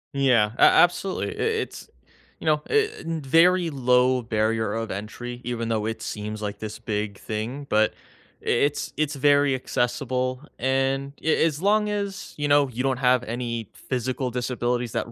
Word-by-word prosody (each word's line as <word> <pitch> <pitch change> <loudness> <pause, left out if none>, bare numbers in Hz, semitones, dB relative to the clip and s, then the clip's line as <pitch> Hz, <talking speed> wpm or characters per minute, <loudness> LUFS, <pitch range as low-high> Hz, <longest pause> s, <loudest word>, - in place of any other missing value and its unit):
Yeah, 125 -6 +3
a - - 0
absolutely, 175 +2 +4
i - - 0
it's, 450 0 -2 0.5
you - - -9
know, 150 -1 +3
i 435 0 +3
in 165 -1 -4
very 170 +4 +4
low 125 -1 +3
barrier 110 0 0
of 115 0 -3
entry 120 +5 -6
even 115 -1 -3
though 110 -1 0
it 110 0 -4
seems 105 0 -5
like 105 -1 -5
this 110 0 -6
big 105 -2 -3
thing, 115 +8 -5
but 110 0 +3
i - - -27
it's 145 +4 +1
it's 150 -1 0
very 145 0 +4
accessible, 130 +1 -1 0.2
and 135 +2 0
a 160 - +3
as 155 0 -1
long 210 +1 +3
as, 200 -2 -4
you 145 0 -1
know, 145 0 +4
you 125 +1 -3
don't 135 -2 +1
have 125 -1 +3
any 115 -2 -4
physical 130 +1 -3
disabilities 120 -1 -2
that 115 - -3
125 Hz, 165 wpm, -25 LUFS, 115-145 Hz, 0.5 s, absolutely